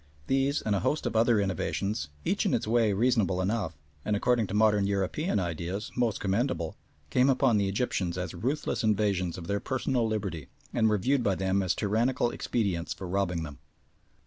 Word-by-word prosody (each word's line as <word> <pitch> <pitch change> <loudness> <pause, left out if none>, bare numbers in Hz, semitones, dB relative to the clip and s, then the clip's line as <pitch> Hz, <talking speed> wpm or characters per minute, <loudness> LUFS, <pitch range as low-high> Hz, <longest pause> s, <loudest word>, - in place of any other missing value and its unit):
These, 135 - +1
and 105 - 0
a - - +1
host 150 - 0
of - - -2
other 115 0 +4
innovations, 100 -2 -1 0.2
each - - +1
in - - +2
its - - -1
way 115 -1 +3
reasonable 105 -4 +2
enough, 95 -5 -1 0.3
and, 105 - 0
according 115 +1 +2
to 100 - -4
modern 105 -2 +4
European 100 - 0
ideas, 90 +3 -3
most 120 -4 0
commendable, 95 - -1 0.4
came 130 +2 +4
upon 130 -4 +3
the 100 -1 +1
Egyptians 95 -4 -1
as 90 0 -3
ruthless 125 - -2
invasions 100 -5 +1
of 85 - -7
their 100 +2 -1
personal 130 -2 0
liberty, 95 -10 -3 0.3
and 110 -2 +3
were 105 - +2
viewed 130 +7 +1
by 100 -4 +2
them 95 +2 +1
as 95 -2 0
tyrannical 120 +4 +1
expedients 95 -7 -1
for 95 +1 -7
robbing 90 -3 -1
them. 75 -3 -8
100 Hz, 180 wpm, -28 LUFS, 95-120 Hz, 0.4 s, other